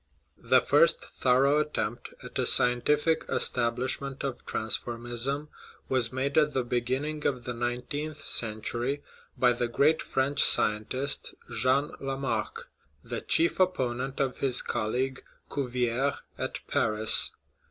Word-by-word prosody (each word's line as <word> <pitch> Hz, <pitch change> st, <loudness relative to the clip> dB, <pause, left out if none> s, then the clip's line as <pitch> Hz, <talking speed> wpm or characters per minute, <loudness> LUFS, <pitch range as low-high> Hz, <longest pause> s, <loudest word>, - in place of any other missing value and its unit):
The -, -, +4 dB
first -, -, +4 dB, 0.2 s
thorough 135 Hz, +3 st, +4 dB
attempt 120 Hz, -7 st, -3 dB
at -, -, -6 dB
a -, -, +3 dB
scientific 150 Hz, +6 st, +2 dB
establish 120 Hz, +2 st, +1 dB
ment 135 Hz, -1 st, -6 dB
of 135 Hz, -3 st, -4 dB
transformism 120 Hz, +5 st, -1 dB, 0.4 s
was 125 Hz, -4 st, +2 dB
made 135 Hz, +3 st, +1 dB
at 150 Hz, -1 st, +1 dB
the 130 Hz, -, +1 dB
beginning 130 Hz, +6 st, -1 dB
of 130 Hz, -3 st, -2 dB
the 125 Hz, -, -4 dB
nineteenth 125 Hz, +6 st, -4 dB
century 120 Hz, +5 st, -1 dB, 0.3 s
by 125 Hz, -1 st, +4 dB
the 120 Hz, 0 st, -1 dB
great 145 Hz, +6 st, +2 dB
French 140 Hz, +2 st, 0 dB
scientist 120 Hz, +6 st, +2 dB, 0.2 s
Jean 130 Hz, +5 st, +2 dB
Lamarck, 135 Hz, -5 st, -3 dB, 0.3 s
the -, -, -5 dB
chief 165 Hz, +3 st, +1 dB
opponent 135 Hz, -8 st, 0 dB
of 135 Hz, -2 st, -1 dB
his 130 Hz, -3 st, +3 dB
colleague, 130 Hz, +5 st, -2 dB, 0.3 s
Cuvier, 125 Hz, 0 st, -1 dB, 0.2 s
at -, -, -4 dB
Paris. 110 Hz, -1 st, +3 dB
130 Hz, 120 wpm, -28 LUFS, 120-140 Hz, 0.4 s, The